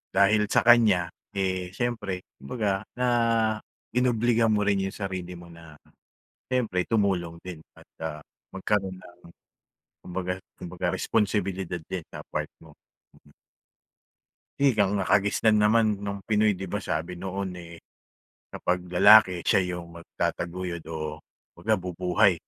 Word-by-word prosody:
Dahil 105 Hz, +1 st, +4 dB
sa -, -, +2 dB
kanya, 110 Hz, -8 st, +5 dB, 0.2 s
eh, 95 Hz, -2 st, -1 dB
siyempre, 105 Hz, -7 st, -2 dB, 0.2 s
kumbaga 100 Hz, -, -2 dB
na 125 Hz, 0 st, 0 dB, 0.9 s
inobliga 120 Hz, -2 st, +2 dB
mo 105 Hz, -2 st, +2 dB
rin 100 Hz, -1 st, +2 dB
iyong -, -, -7 dB
sarili 95 Hz, -3 st, -5 dB
mo 85 Hz, 0 st, -12 dB
na, 80 Hz, -2 st, -14 dB, 0.7 s
siyempre 115 Hz, -8 st, 0 dB
tumulong 95 Hz, -6 st, +1 dB
din 90 Hz, -3 st, -7 dB, 0.2 s
at, -, -, -17 dB
ah, 80 Hz, -2 st, -4 dB, 0.3 s
magkaroon 95 Hz, -1 st, -1 dB
ng 90 Hz, -1 st, -15 dB, 0.9 s
kumbaga 90 Hz, 0 st, -3 dB, 0.2 s
kumbaga 90 Hz, 0 st, -5 dB
responsibilidad 95 Hz, -4 st, -1 dB
din 90 Hz, -3 st, -4 dB
sa -, -, -8 dB
part -, -, -3 dB
mo. 80 Hz, -2 st, -16 dB, 1.9 s
Eh, 140 Hz, -3 st, +4 dB
ang 100 Hz, -1 st, +2 dB
nakagisnan 100 Hz, +3 st, +3 dB
naman 105 Hz, -1 st, +3 dB
noong 100 Hz, -1 st, -5 dB
Pinoy 105 Hz, -2 st, +2 dB
'di 95 Hz, -, -5 dB
ba 90 Hz, -, -3 dB
sabi 85 Hz, +3 st, -3 dB
noon, 95 Hz, +1 st, -4 dB
eh, 85 Hz, 0 st, -11 dB, 0.7 s
kapag 90 Hz, 0 st, -1 dB
lalaki, 90 Hz, -1 st, +6 dB
siya 95 Hz, -, +4 dB, 0.2 s
iyong 85 Hz, -1 st, -10 dB
magtataguyod 85 Hz, 0 st, -3 dB
o 75 Hz, -2 st, -5 dB, 0.3 s
kumbaga 110 Hz, +5 st, 0 dB
bubuhay, 90 Hz, +2 st, +2 dB
95 Hz, 125 wpm, -26 LUFS, 90-105 Hz, 1.9 s, lalaki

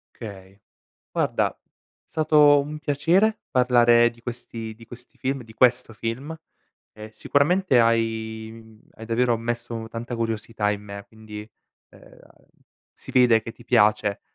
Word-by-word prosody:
Okay. 100 Hz, -3 st, -11 dB, 0.5 s
Guarda -, -, 0 dB, 0.5 s
stato 150 Hz, -2 st, +4 dB
un 150 Hz, +2 st, -6 dB
piacere 170 Hz, +10 st, +2 dB
parlare 120 Hz, -2 st, +4 dB
di 115 Hz, 0 st, -19 dB
questi 115 Hz, -2 st, -7 dB
di 115 Hz, +1 st, -15 dB
questi 120 Hz, +1 st, -12 dB
film 135 Hz, 0 st, -2 dB
di 110 Hz, 0 st, -15 dB
questo 120 Hz, -1 st, +2 dB
film. 125 Hz, +9 st, -5 dB, 0.6 s
E 110 Hz, 0 st, -11 dB
sicuramente 145 Hz, -, +2 dB
hai, 110 Hz, -1 st, 0 dB
mhmm, 110 Hz, -1 st, -15 dB, 0.2 s
hai 110 Hz, -, -10 dB
davvero 115 Hz, +1 st, +1 dB
messo 115 Hz, -1 st, -4 dB
tanta 120 Hz, +2 st, -6 dB
curiosità 110 Hz, -2 st, -2 dB
in 105 Hz, 0 st, -4 dB
me. 100 Hz, -1 st, -9 dB
Quindi, 110 Hz, -1 st, -11 dB, 0.4 s
ehm, -, -, -18 dB, 0.7 s
si -, -, -12 dB
vede 120 Hz, -3 st, +5 dB
che 115 Hz, -, -8 dB
ti 120 Hz, -, -17 dB
piace, 105 Hz, -1 st, +2 dB
115 Hz, 135 wpm, -24 LUFS, 110-125 Hz, 0.7 s, vede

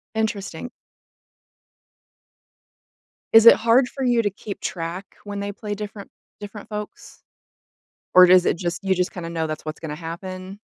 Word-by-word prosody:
Interesting. 220 Hz, -1 st, -3 dB, 2.6 s
Is 225 Hz, 0 st, +8 dB
it -, -, +10 dB
hard 235 Hz, +3 st, +3 dB
for 270 Hz, +1 st, -6 dB
you 240 Hz, -2 st, +3 dB
to 205 Hz, -, 0 dB
keep 200 Hz, +1 st, -8 dB
track 175 Hz, +2 st, -5 dB
when 205 Hz, -1 st, -6 dB
they 200 Hz, 0 st, -3 dB
play 210 Hz, 0 st, -6 dB
different 205 Hz, -1 st, -8 dB, 0.3 s
different 205 Hz, 0 st, -9 dB
folks? 210 Hz, 0 st, -8 dB, 0.9 s
Or 185 Hz, 0 st, +9 dB
does 180 Hz, 0 st, +6 dB
it -, -, +1 dB
just 175 Hz, +2 st, -4 dB
you 190 Hz, -1 st, +2 dB
just 180 Hz, 0 st, -1 dB
kinda 170 Hz, -2 st, -6 dB
know 160 Hz, -1 st, -2 dB
that's 155 Hz, 0 st, -6 dB
what's 155 Hz, 0 st, -6 dB
gonna 155 Hz, -2 st, -5 dB
happen? 185 Hz, +4 st, -8 dB
195 Hz, 150 wpm, -22 LUFS, 175-210 Hz, 2.6 s, it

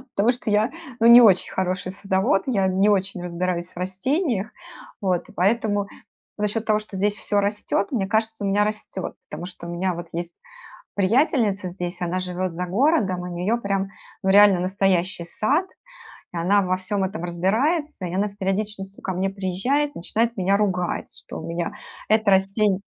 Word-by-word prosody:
потому 220 Hz, +5 st, +3 dB
что 240 Hz, -3 st, -5 dB
я, 215 Hz, +5 st, +2 dB, 0.3 s
ну, 230 Hz, -, +5 dB
не 235 Hz, +1 st, +10 dB
очень 195 Hz, -6 st, +5 dB
хороший 185 Hz, -1 st, -2 dB
садовод, 195 Hz, 0 st, +1 dB
я 200 Hz, -7 st, +2 dB
не 190 Hz, +2 st, +3 dB
очень 195 Hz, -2 st, 0 dB
разбираюсь 175 Hz, 0 st, -2 dB
в -, -, -19 dB
растениях. 215 Hz, -, -1 dB, 0.5 s
Вот, 185 Hz, -3 st, 0 dB
и -, -, -12 dB
поэтому 205 Hz, +1 st, +1 dB, 0.5 s
за 210 Hz, -, +1 dB
счет 220 Hz, +2 st, -3 dB
того, 215 Hz, -1 st, +2 dB
что 210 Hz, -2 st, -10 dB
здесь 205 Hz, +2 st, +1 dB
всё 205 Hz, -1 st, 0 dB
растет, 200 Hz, 0 st, -1 dB
мне 210 Hz, -8 st, 0 dB
кажется, 220 Hz, +1 st, 0 dB
у -, -, +1 dB
меня 200 Hz, +1 st, +3 dB
растет. 210 Hz, -3 st, -4 dB, 0.2 s
Потому 175 Hz, -, -6 dB
что 180 Hz, -1 st, -9 dB
у -, -, -5 dB
меня 180 Hz, +1 st, -1 dB
вот 170 Hz, 0 st, -7 dB
есть 170 Hz, 0 st, -5 dB, 0.6 s
приятельница 205 Hz, -, +2 dB
здесь, 175 Hz, 0 st, -6 dB
она 175 Hz, +1 st, -1 dB
живет 180 Hz, 0 st, -3 dB
за 180 Hz, +2 st, -3 dB
городом, 200 Hz, -, +2 dB
у 180 Hz, -, -5 dB
неё 185 Hz, +7 st, 0 dB
прям, 195 Hz, -3 st, -1 dB, 0.4 s
ну, 190 Hz, -, +1 dB
реально 200 Hz, -2 st, +7 dB
настоящий 185 Hz, -1 st, 0 dB
сад, 280 Hz, -, +1 dB, 0.7 s
и -, -, -7 dB
она 195 Hz, +4 st, +3 dB
во 185 Hz, 0 st, 0 dB
всём 190 Hz, +1 st, -2 dB
этом 190 Hz, -1 st, -4 dB
разбирается, 225 Hz, -, 0 dB
и 170 Hz, -, -5 dB
она 200 Hz, +2 st, +1 dB
с 200 Hz, -, -9 dB
периодичностью 195 Hz, 0 st, -3 dB
ко 190 Hz, -, -1 dB
мне 190 Hz, +2 st, 0 dB
приезжает, 200 Hz, +10 st, 0 dB
начинает 230 Hz, +7 st, -1 dB
меня 195 Hz, +1 st, +2 dB
ругать, 185 Hz, -4 st, -1 dB
что -, -, -9 dB
у -, -, -7 dB
меня 170 Hz, 0 st, -3 dB, 0.4 s
это 220 Hz, -1 st, +3 dB
растень 195 Hz, +1 st, +2 dB
195 Hz, 180 wpm, -23 LUFS, 185-215 Hz, 0.7 s, не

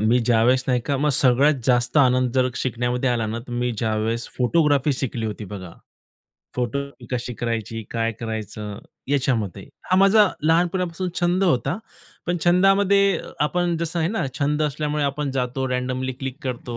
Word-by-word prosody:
मी 115 Hz, +4 st, +3 dB
ज्यावेळेस 120 Hz, +2 st, +3 dB
नाही 125 Hz, -2 st, +2 dB
का 140 Hz, -, +1 dB
मग 150 Hz, +3 st, +1 dB
सगळ्यात 135 Hz, +3 st, +4 dB
जास्त 125 Hz, +1 st, +2 dB
आनंद 130 Hz, -2 st, +3 dB
जर 130 Hz, -1 st, +3 dB
शिकण्यामध्ये 125 Hz, +1 st, -1 dB
आला 115 Hz, -2 st, 0 dB
ना, 110 Hz, +2 st, -3 dB
तर 120 Hz, +2 st, -11 dB
मी 120 Hz, +1 st, 0 dB
ज्यावेळेस 110 Hz, +1 st, -1 dB
फोटोग्राफी 145 Hz, +1 st, +2 dB
शिकली 120 Hz, -4 st, -3 dB
होती 105 Hz, 0 st, -5 dB
बघा. 95 Hz, -4 st, -7 dB, 0.9 s
फोटो 125 Hz, +2 st, -1 dB, 0.3 s
कशी 125 Hz, -1 st, -3 dB
करायची, 115 Hz, 0 st, -3 dB
काय 115 Hz, 0 st, -1 dB
करायचं 105 Hz, -2 st, -5 dB, 0.3 s
याच्यामध्ये. 125 Hz, -9 st, 0 dB, 0.3 s
हा 185 Hz, -, +4 dB
माझा 195 Hz, +1 st, +6 dB
लहानपणापासून 175 Hz, +2 st, +1 dB
छंद 180 Hz, +2 st, +2 dB
होता. 170 Hz, -, +1 dB, 0.5 s
पण 175 Hz, -, 0 dB
छंदामध्ये 195 Hz, +2 st, +4 dB, 0.2 s
आपण 175 Hz, +3 st, +1 dB
जसं 170 Hz, +1 st, -2 dB
आहे 165 Hz, 0 st, +1 dB
ना, 220 Hz, -4 st, -1 dB
छंद 150 Hz, +1 st, +1 dB
असल्यामुळे 150 Hz, 0 st, -1 dB
आपण 140 Hz, 0 st, -1 dB
जातो, 130 Hz, 0 st, -2 dB
रँडमली 130 Hz, +1 st, -2 dB
क्लिक 135 Hz, +1 st, -5 dB
करतो 120 Hz, -2 st, -4 dB
130 Hz, 155 wpm, -23 LUFS, 120-155 Hz, 0.9 s, माझा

